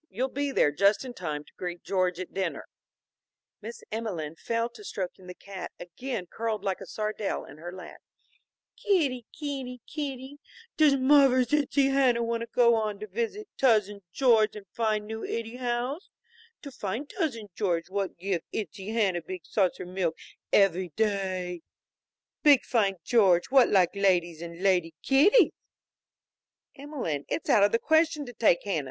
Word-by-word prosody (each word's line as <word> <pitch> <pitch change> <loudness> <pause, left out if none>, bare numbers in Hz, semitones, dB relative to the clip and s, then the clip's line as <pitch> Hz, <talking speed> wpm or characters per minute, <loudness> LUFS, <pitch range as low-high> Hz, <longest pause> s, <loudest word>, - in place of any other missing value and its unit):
You'll 255 +6 -2
be 285 +1 -2
there 150 - +3
just 200 - +2
in 250 - -7
time 150 -8 -4
to - - -22
greet 175 -1 -5
George 185 -2 0
at 185 - -7
dinner." 190 -3 -3 1.0
Miss 230 +3 -9
Emelene 185 -9 -4
fell 230 +6 -1
to 240 - -14
stroking 185 - -6
the 180 - -8
cat, 195 -3 -8
again 180 +4 -5
curled 220 +2 -3
like 190 -1 -2
a 195 - -8
sardelle 215 0 -3
in 145 - -13
her 175 +2 -7
lap. 180 -1 -10 0.8
"Kitti 280 - +1
kitti 270 -4 -5
kitti, 280 -2 -6 0.4
does 300 -3 +5
muvver's 260 -2 +4
ittsie 285 -2 +3
Hanna 255 -4 +3
want 230 0 -1
to 230 - -4
go 235 0 +4
on 215 -2 0
visit 235 - -3
to - - +1
Tousin 205 -3 +2
George 225 -2 +3
in 210 -2 -9
fine 215 -2 0
new 220 +1 -6
ittie 230 +1 -4
house? 250 - -2 0.5
To 280 - -8
fine 225 +3 -4
Tousin 265 - -3
Georgie 175 -3 -1
what 200 -1 -2
give 180 -1 -2
ittsie 195 0 -5
Hanna 195 -6 +1
big 180 0 -8
saucer 185 -3 0
milk 180 -2 -2 0.3
evvy 185 -2 +3
day? 190 -5 -1 0.8
Big 285 -4 +6
fine 205 -5 +1
George 190 -6 +3
what 265 -2 +6
like 185 -4 +3
ladies 175 -4 +1
and 170 +1 -8
lady 175 -4 +2
kitties!" 305 - +5 1.2
"Emelene, 270 - -4
it's - - -1
out 215 - +5
of 205 0 +5
the 230 - +3
question 315 +2 +2
to 245 - -9
take 220 -6 +3
Hanna. 195 -6 -1
215 Hz, 160 wpm, -28 LUFS, 185-255 Hz, 1.2 s, Big